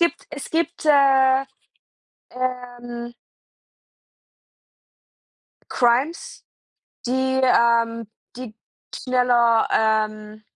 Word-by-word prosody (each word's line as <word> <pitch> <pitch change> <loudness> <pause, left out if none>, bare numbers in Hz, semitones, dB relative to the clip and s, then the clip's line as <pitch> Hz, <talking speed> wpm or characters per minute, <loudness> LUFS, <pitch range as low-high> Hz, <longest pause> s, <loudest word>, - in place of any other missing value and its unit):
gibt 340 0 -1
es 290 -2 -8
gibt, 335 0 -3
äh, 270 -2 +4 0.9
ähm 245 -1 -6 2.6
Crimes, 255 +7 -1 0.6
die, 260 +1 0
ähm, 230 -2 +2 0.3
die 245 -3 -9
die - - -51 0.5
schneller, 240 -2 +2
ähm 215 -1 -1
245 Hz, 70 wpm, -21 LUFS, 230-265 Hz, 2.6 s, äh